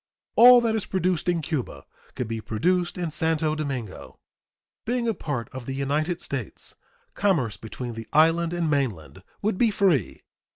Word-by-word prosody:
All 245 Hz, +1 st, +9 dB
that 225 Hz, -2 st, +1 dB
is 220 Hz, -, -3 dB
produced 180 Hz, -2 st, 0 dB
in 170 Hz, -2 st, 0 dB
Cuba 130 Hz, -, -4 dB, 0.3 s
could 125 Hz, -4 st, -3 dB
be 115 Hz, 0 st, -4 dB
produced 175 Hz, +13 st, 0 dB
in 175 Hz, -3 st, -3 dB
Santo 155 Hz, 0 st, 0 dB
Domingo. 135 Hz, -9 st, -5 dB, 0.7 s
Being 240 Hz, 0 st, -1 dB
a 225 Hz, -, +2 dB
part 135 Hz, -, -4 dB
of 130 Hz, -2 st, -8 dB
the 135 Hz, -, -3 dB
United 150 Hz, +5 st, -1 dB
States, -, -, -6 dB, 0.4 s
commerce 150 Hz, -, +1 dB
between 115 Hz, +4 st, -7 dB
the 115 Hz, 0 st, -8 dB
island 165 Hz, +2 st, +3 dB
and 175 Hz, -1 st, -1 dB
mainland 115 Hz, -, -2 dB, 0.2 s
would 210 Hz, -2 st, 0 dB
be 235 Hz, -, +4 dB
free. 185 Hz, -, +1 dB
155 Hz, 160 wpm, -25 LUFS, 125-180 Hz, 0.7 s, All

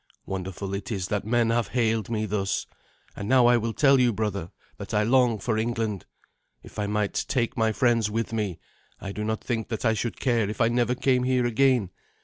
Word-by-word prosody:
Wonderful 95 Hz, +1 st, -5 dB
it 100 Hz, +3 st, -4 dB
is 95 Hz, -3 st, -3 dB
that 100 Hz, -1 st, -1 dB
men 115 Hz, 0 st, +2 dB
have 115 Hz, -2 st, +1 dB
hailed 110 Hz, -1 st, 0 dB
me 110 Hz, -2 st, -1 dB
thus. 100 Hz, -1 st, -1 dB, 0.5 s
And 100 Hz, -, -5 dB
now 130 Hz, -2 st, +5 dB
I 120 Hz, 0 st, +6 dB
will 115 Hz, 0 st, -1 dB
tell 135 Hz, +4 st, +4 dB
you, 125 Hz, -1 st, +4 dB
brother, 100 Hz, -5 st, -3 dB, 0.3 s
that -, -, -5 dB
I 105 Hz, -, +3 dB
long 120 Hz, 0 st, +3 dB
for 110 Hz, +2 st, -1 dB
England. 110 Hz, -4 st, -2 dB, 0.6 s
If -, -, -10 dB
I 105 Hz, -, -1 dB
might 105 Hz, -1 st, -1 dB
take 120 Hz, -3 st, 0 dB
my 110 Hz, -1 st, +2 dB
friends 115 Hz, -2 st, +2 dB
with 115 Hz, +1 st, -2 dB
me, 105 Hz, -6 st, -2 dB, 0.4 s
I 100 Hz, -, -6 dB
do 105 Hz, +1 st, -4 dB
not 110 Hz, 0 st, -2 dB
think 115 Hz, -3 st, -2 dB
that 115 Hz, 0 st, -4 dB
I 115 Hz, -, +4 dB
should 115 Hz, +1 st, -3 dB
care 115 Hz, -5 st, +1 dB
if 105 Hz, -, -6 dB
I 115 Hz, -1 st, +4 dB
never 120 Hz, +1 st, +1 dB
came 125 Hz, 0 st, +2 dB
here 125 Hz, -1 st, +1 dB
again. 120 Hz, -4 st, +2 dB
110 Hz, 210 wpm, -26 LUFS, 105-120 Hz, 0.6 s, I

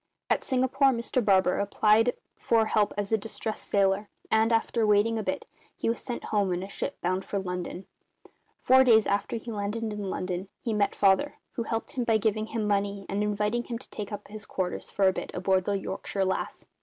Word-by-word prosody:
At -, -, +2 dB
Singapore 260 Hz, +2 st, +2 dB
Mr 240 Hz, 0 st, 0 dB
Barber 190 Hz, -3 st, +3 dB
applied 215 Hz, +3 st, +3 dB, 0.2 s
for 225 Hz, -1 st, +2 dB
help 210 Hz, -1 st, +2 dB
as 205 Hz, 0 st, -2 dB
a 220 Hz, -, +3 dB
distressed 220 Hz, +1 st, -4 dB
sailor, 200 Hz, +1 st, +2 dB, 0.2 s
and, 220 Hz, +1 st, +4 dB
after 225 Hz, 0 st, +2 dB
waiting 210 Hz, +2 st, +3 dB
a -, -, -1 dB
bit, 185 Hz, -2 st, -3 dB, 0.3 s
he -, -, -1 dB
was 230 Hz, -, -4 dB
sent 245 Hz, -, -5 dB
home 200 Hz, -3 st, +2 dB
in 175 Hz, +1 st, -2 dB
a -, -, -6 dB
ship 200 Hz, -, -5 dB
bound 185 Hz, +2 st, 0 dB
for 200 Hz, -, -3 dB
London. 180 Hz, -1 st, -4 dB, 0.8 s
Four 260 Hz, +1 st, +7 dB
days 225 Hz, -4 st, +5 dB
after 200 Hz, +3 st, 0 dB
he 230 Hz, +1 st, -5 dB
landed 210 Hz, +2 st, -3 dB
in 210 Hz, -3 st, -3 dB
London 185 Hz, +1 st, -3 dB
he 230 Hz, -, -2 dB
met 210 Hz, -1 st, +1 dB
Father, 200 Hz, +9 st, +3 dB, 0.2 s
who 245 Hz, -, -4 dB
helped 225 Hz, 0 st, -3 dB
him 250 Hz, -, -2 dB
by 225 Hz, -2 st, +3 dB
giving 215 Hz, 0 st, 0 dB
him 220 Hz, -2 st, -2 dB
money 200 Hz, -1 st, 0 dB
and 200 Hz, +1 st, -1 dB
inviting 210 Hz, +3 st, 0 dB
him 235 Hz, -, -4 dB
to 250 Hz, -, -13 dB
take 210 Hz, 0 st, -6 dB
up 205 Hz, 0 st, -6 dB
his 210 Hz, 0 st, -9 dB
quarters, 180 Hz, -1 st, -3 dB
for 195 Hz, -1 st, +2 dB
a 190 Hz, -, +4 dB
bit, -, -, -5 dB
aboard 185 Hz, 0 st, +1 dB
the 205 Hz, -, 0 dB
Yorkshire 195 Hz, 0 st, -3 dB
Lass. 190 Hz, -, -3 dB
210 Hz, 205 wpm, -28 LUFS, 195-225 Hz, 0.8 s, Four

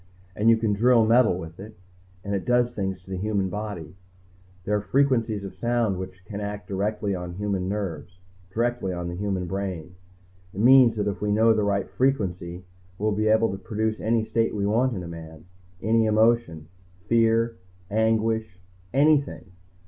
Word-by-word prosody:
And 110 Hz, +2 st, +3 dB
you 115 Hz, -, +6 dB
can 110 Hz, -2 st, 0 dB
drill 115 Hz, +2 st, +4 dB
metal 115 Hz, -4 st, +4 dB
with 80 Hz, -1 st, -9 dB
it 105 Hz, 0 st, -10 dB, 0.5 s
and 100 Hz, -, -3 dB
it 100 Hz, -, -1 dB
does 120 Hz, 0 st, +2 dB
things 95 Hz, -2 st, -4 dB
to 95 Hz, -, -13 dB
the 95 Hz, -, -3 dB
human 100 Hz, -1 st, -1 dB
body. 100 Hz, -5 st, -6 dB, 0.7 s
"There 105 Hz, +3 st, 0 dB
are 105 Hz, -, 0 dB
frequencies 115 Hz, -2 st, +1 dB
of 95 Hz, -, -7 dB
sound 115 Hz, -5 st, 0 dB
which 95 Hz, 0 st, -8 dB
can 105 Hz, +1 st, -6 dB
act 105 Hz, 0 st, -5 dB
directly 100 Hz, +1 st, -2 dB
on 90 Hz, -1 st, -5 dB
human 95 Hz, -1 st, -2 dB
nerves, 95 Hz, -3 st, -5 dB, 0.3 s
directly 120 Hz, -3 st, -1 dB
on 85 Hz, 0 st, -4 dB
the 85 Hz, -, -5 dB
human 95 Hz, -1 st, -2 dB
brain. 90 Hz, -3 st, -4 dB, 0.6 s
It -, -, -5 dB
means 125 Hz, -1 st, +7 dB
that 105 Hz, -1 st, -1 dB
if 100 Hz, 0 st, -3 dB
we 105 Hz, 0 st, 0 dB
know 110 Hz, +2 st, +4 dB
the 110 Hz, -, 0 dB
right 100 Hz, -1 st, 0 dB
frequency, 90 Hz, -9 st, -1 dB, 0.3 s
we'll 105 Hz, +1 st, 0 dB
be 105 Hz, +1 st, 0 dB
able 110 Hz, 0 st, +3 dB
to 95 Hz, -, -6 dB
produce 110 Hz, +1 st, -2 dB
any 115 Hz, 0 st, +1 dB
state 115 Hz, 0 st, 0 dB
we 100 Hz, -1 st, -1 dB
want 120 Hz, +4 st, +1 dB
in 90 Hz, -, -5 dB
a -, -, -7 dB
man, 80 Hz, -1 st, -10 dB, 0.4 s
any 110 Hz, +2 st, +3 dB
emotion. 110 Hz, -8 st, +2 dB, 0.4 s
Fear, 115 Hz, 0 st, +2 dB, 0.3 s
anguish, 110 Hz, -1 st, 0 dB, 0.3 s
anything. 140 Hz, -, +2 dB
105 Hz, 175 wpm, -25 LUFS, 95-115 Hz, 0.7 s, means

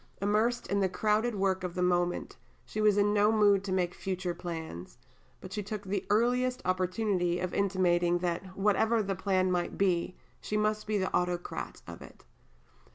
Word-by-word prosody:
Immersed 215 Hz, +4 st, +1 dB
in 200 Hz, -, 0 dB
the 190 Hz, -1 st, +2 dB
crowded 215 Hz, +4 st, +1 dB
work 190 Hz, -1 st, 0 dB
of 180 Hz, -1 st, -4 dB
the 180 Hz, -, 0 dB
moment, 175 Hz, 0 st, 0 dB, 0.3 s
she 215 Hz, -, -4 dB
was 210 Hz, -1 st, +4 dB
in 205 Hz, 0 st, +3 dB
no 210 Hz, +1 st, +4 dB
mood 205 Hz, -3 st, +4 dB
to 195 Hz, -, -3 dB
make 180 Hz, -2 st, 0 dB
future 185 Hz, -2 st, -3 dB
plans; 160 Hz, -, -7 dB, 0.4 s
but 185 Hz, 0 st, -10 dB
she 210 Hz, -, -2 dB
took 205 Hz, 0 st, -5 dB
the 195 Hz, 0 st, -3 dB
earliest 250 Hz, +4 st, +2 dB
opportunity 185 Hz, -1 st, 0 dB
of 185 Hz, 0 st, -3 dB
intimating 175 Hz, -3 st, +2 dB
that, 180 Hz, +2 st, -4 dB
whatever 215 Hz, +3 st, +2 dB
the 195 Hz, 0 st, -1 dB
plan 185 Hz, -1 st, +1 dB
might 175 Hz, -1 st, -1 dB
be, 180 Hz, -2 st, +1 dB, 0.2 s
she 210 Hz, -, -3 dB
must 215 Hz, 0 st, 0 dB
be 215 Hz, -1 st, +1 dB
the 190 Hz, -1 st, -2 dB
autocrat 180 Hz, 0 st, -3 dB
of -, -, -10 dB
it. -, -, -14 dB
190 Hz, 175 wpm, -30 LUFS, 180-210 Hz, 0.4 s, was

